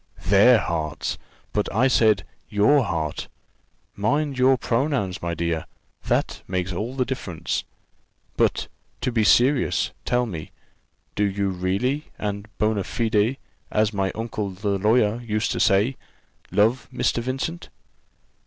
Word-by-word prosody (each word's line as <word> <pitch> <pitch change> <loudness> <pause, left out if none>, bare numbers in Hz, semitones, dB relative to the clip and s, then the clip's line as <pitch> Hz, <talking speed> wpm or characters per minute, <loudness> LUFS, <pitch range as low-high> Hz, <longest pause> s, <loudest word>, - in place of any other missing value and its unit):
"Their 100 +6 +6
hearts! 80 -6 -2 0.3
but 105 - 0
I 120 +6 +3
said 110 -7 +3 0.2
your 110 +8 +4
heart: 80 -5 -3 0.7
mind 145 +8 0
your 130 +1 +4
pronouns, 120 -6 -1
my 85 0 -2
dear; 85 -2 -2 0.4
that - - 0
makes 90 0 -2
all 110 +8 -3
the 130 -2 +1
difference. 95 -11 -3 0.7
But, - - +1 0.3
to 125 +1 0
be 115 -2 +2
serious, 125 +5 +3
tell 125 0 +1
me, 85 -9 -6 0.6
do 105 - 0
you 100 0 0
really 100 +11 -1
and 100 0 -4
bona 105 -2 +1
fide, 110 +4 +1 0.3
as 105 0 +1
my 95 -1 0
old 110 - -4
uncle 105 -3 -3
the 100 +1 -2
lawyer 110 +2 +3
used 110 -2 -1
to - - -2
say, 105 +6 +3 0.5
love 115 +5 +2
Mr. 120 - 0
Vincent?" 135 +8 -4
105 Hz, 135 wpm, -24 LUFS, 95-125 Hz, 0.7 s, Their